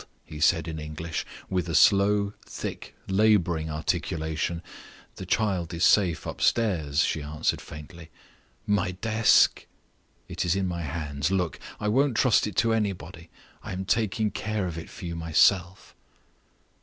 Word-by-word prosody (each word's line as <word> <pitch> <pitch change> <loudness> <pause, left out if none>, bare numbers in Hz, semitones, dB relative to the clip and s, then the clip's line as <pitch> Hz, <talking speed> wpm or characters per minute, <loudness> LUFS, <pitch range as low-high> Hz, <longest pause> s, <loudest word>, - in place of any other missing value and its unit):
he 75 - -9
said 80 +2 +3
in 80 -1 -5
English, 75 +2 -5 0.2
with 90 -2 -2
a 80 - -1
slow, 100 0 +4
thick, - - -7
laboring 95 -6 +2
articulation. 80 +2 -2 0.5
"The 95 - -7
child 95 -5 0
is 85 - +2
safe 90 -6 +3
upstairs," 85 -10 +1
she 80 - -1
answered, 75 +2 -2
faintly. 75 +2 -11 0.6
"My 95 -3 0
desk?" 110 +4 +3 0.6
"It - - -3
is 85 +1 +1
in 95 -1 0
my 85 -1 -3
hands. 75 -1 -3
Look! 90 -5 -1 0.2
I 105 - -2
won't 130 +2 +2
trust 125 -5 +3
it 105 - -6
to 115 +2 +2
anybody; 90 -6 -3 0.3
I - - -7
am 95 +1 -4
taking 110 0 0
care 110 -3 -2
of 85 -3 -4
it 80 - -7
for - - -10
you 85 -1 -4
myself." 85 +3 +2
90 Hz, 145 wpm, -26 LUFS, 80-105 Hz, 0.6 s, slow